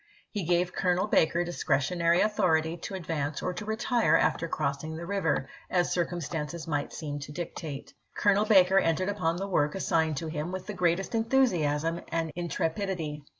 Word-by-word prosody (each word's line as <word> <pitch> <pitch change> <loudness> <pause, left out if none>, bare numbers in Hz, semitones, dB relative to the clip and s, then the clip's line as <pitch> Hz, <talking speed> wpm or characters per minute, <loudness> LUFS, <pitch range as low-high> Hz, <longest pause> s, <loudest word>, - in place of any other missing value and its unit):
He 205 -5 -3
gave 175 +1 +1
Colonel 180 0 +1
Baker 170 -4 +3
discretionary 170 +1 +1
authority 175 -7 +2
to 185 +3 -6
advance 155 -5 -3
or 180 - -1
to 180 +4 -6
retire 220 -4 +2
after 170 - +1
crossing 155 0 -2
the 170 +1 -6
river, 170 -8 0 0.2
as 175 -1 +1
circumstances 170 -2 -3
might 145 -2 -1
seem 145 -2 -5
to 145 +1 -8
dictate. 155 -3 -6 0.2
Colonel 205 +1 +3
Baker 190 -3 +6
entered 185 +2 +1
upon 180 -5 0
the 195 +2 -3
work 150 -5 +1
assigned 160 -5 +1
to 165 - -3
him 155 +2 -3
with 185 0 -5
the 210 - -5
greatest 180 +1 0
enthusiasm 175 - +1
and 165 -1 -2
intre 170 -2 -1
pidity. 170 -7 -3
170 Hz, 165 wpm, -28 LUFS, 160-190 Hz, 0.2 s, Baker